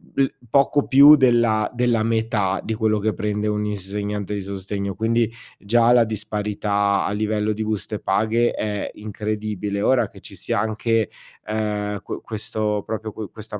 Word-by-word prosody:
l 135 -1 +1 0.2
poco 140 +3 +3
più 140 +3 +9
della 120 -5 +3
della 120 -2 +2
metà, 110 -4 0
di 110 - -3
quello 110 -1 +1
che 105 +1 0
prende 105 +2 -2
un 105 0 -1
insegnante 105 0 -4
di 100 - -2
sostegno. 100 0 -4
Quindi, 115 +1 +1 0.3
già 115 +3 +3
la 120 -1 +6
disparità 105 -2 -1
a - - -1
livello 105 0 0
di 110 +1 -3
buste 105 0 -3
paghe 110 +4 +1
è 105 -1 -3
incredibile. 105 -1 -3
Ora, 130 +1 +3
che - - -16
ci - - -10
sia - - -2
anche, 110 0 0 0.4
uhm, 105 -1 -2
que - - -6
questo 105 -1 -2
proprio 110 0 -5
qu 110 -2 -6
questa 110 -1 -8
105 Hz, 160 wpm, -22 LUFS, 105-110 Hz, 0.4 s, più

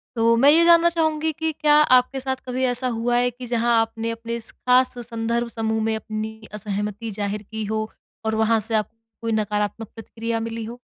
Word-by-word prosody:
तो 230 0 +3
मैं 270 +5 +5
ये 330 +2 +5
जानना 340 0 +6
चाहूँगी 315 -1 0
कि 320 +1 -2
क्या 300 -1 +4 0.2
आपके 255 +2 -1
साथ 265 0 -2
कभी 255 +1 -2
ऐसा 250 +1 +1
हुआ 240 +1 0
है 245 0 +2
कि 250 +1 -9
जहाँ 235 0 +2
आपने 225 0 -3
अपने 230 0 -5
इस 230 -1 -5
ख़ास 255 0 +2
संदर्भ 235 0 -1
समूह 220 -1 -2
में 220 0 0
अपनी 220 0 -5
असहमति 210 +1 -4
ज़ाहिर 205 +1 -3
की 220 0 -4
हो, 215 +1 -2 0.4
और 220 0 0
वहाँ 220 0 +3
से 220 +2 +1
आपको 215 +1 -2 0.2
कोई 230 0 -2
नकारात्मक 210 0 -1
प्रतिक्रिया 225 0 -4
मिली 230 0 -4
हो? 235 +2 -8
230 Hz, 200 wpm, -23 LUFS, 220-250 Hz, 0.4 s, जानना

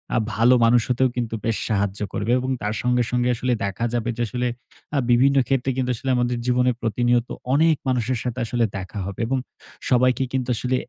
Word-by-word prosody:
আ - - +3 0.2
ভালো 120 +3 +5
মানুষ 120 +1 +5
হতেও 130 +1 +2
কিন্তু 115 -2 -2
বেশ 115 -1 0
সাহায্য 100 -2 0
করবে 110 +4 -1
এবং 130 +1 -3
তার 105 +1 -1
সঙ্গে, 125 0 +2
সঙ্গে, 125 0 +1
আসলে 125 +1 0
দেখা 100 +4 -2
যাবে 120 0 -1
যে, - - -2
আসলে 125 +2 -2 0.5
আ - - +2
বিভিন্ন 135 +3 +4
ক্ষেত্রে 135 -1 0
কিন্তু 125 -1 0
আসলে 130 +4 -5
আমাদের 120 0 0
জীবনে 125 0 +2
প্রতিনিয়ত 120 +2 +1 0.2
অনেক 160 +2 +4
মানুষের 125 -1 0
সাথে 125 0 -3
আসলে 120 0 +1
দেখা 95 +2 -6
হবে 100 +2 -7
এবং 135 +1 0 0.5
সবাইকে 130 +1 +3
কিন্তু 130 -1 -1
আসলে 125 +3 -1
125 Hz, 195 wpm, -23 LUFS, 115-125 Hz, 0.5 s, ভালো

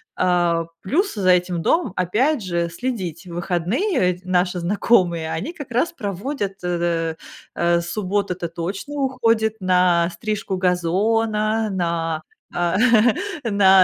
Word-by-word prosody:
А 175 -2 +2 0.2
плюс 360 - 0
за 190 -3 +1
этим 180 -1 +3
домом 310 - +1
опять 245 - +1
же 170 -2 -1
следить. 185 -4 -4
В 170 - -8
выходные 190 - 0
ведь 180 0 0
наши 180 0 +1
знакомые, 175 -3 +2
они 330 - -5
как 290 -7 -9
раз 250 +9 +1
проводят, 205 - -3
э, 170 -2 -1 0.4
э, 170 0 +2
суббота- 200 +1 -1
это 175 -1 -4
точно 190 - -5
уходит 230 -5 +1
на 180 -2 +3
стрижку 210 -2 -3
газона, 215 +5 +1
на, 170 -3 -1 0.3
а 175 +1 +1 0.7
на 195 -4 +6
185 Hz, 125 wpm, -21 LUFS, 175-220 Hz, 0.7 s, на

